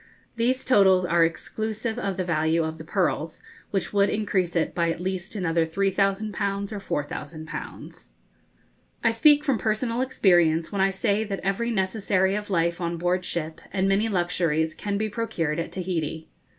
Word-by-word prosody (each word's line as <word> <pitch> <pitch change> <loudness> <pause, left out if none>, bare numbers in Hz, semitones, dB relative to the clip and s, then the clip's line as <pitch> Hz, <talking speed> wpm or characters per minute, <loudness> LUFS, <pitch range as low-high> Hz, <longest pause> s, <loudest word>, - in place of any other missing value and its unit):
These 250 +3 0
totals 190 -7 +5
are 170 -1 +3
exclusive 220 +7 -2
of 200 -5 -2
the 185 - 0
value 165 -1 +1
of 160 0 -4
the - - -7
pearls, 165 -2 -1 0.3
which 195 -1 -2
would 200 0 +4
increase 190 -5 0
it 165 - +1
by 170 -1 +1
at 165 - -2
least 190 +2 -4
another 170 -4 +1
3,000_l_ 195 +3 0 0.2
or 145 - +1
4,000_l_. 155 +2 -8 0.9
I 230 - +4
speak 290 +6 +5
from 275 -6 +1
personal 230 +2 0
experience 175 -10 +3
when 200 -2 -1
I 195 - +4
say 200 +2 0
that 200 -2 -4
every 195 +5 0
necessary 190 -2 +1
of 210 0 -3
life 170 -2 +1
on 170 0 -2
board 180 +2 0
ship, 160 -3 -3
and 190 0 +1
many 200 +3 +2
luxuries, 170 -4 0
can 200 +5 -3
be 215 +1 0
procured 175 -8 -2
at 170 - -3
Tahiti. 165 -4 -3
190 Hz, 165 wpm, -25 LUFS, 170-210 Hz, 0.9 s, totals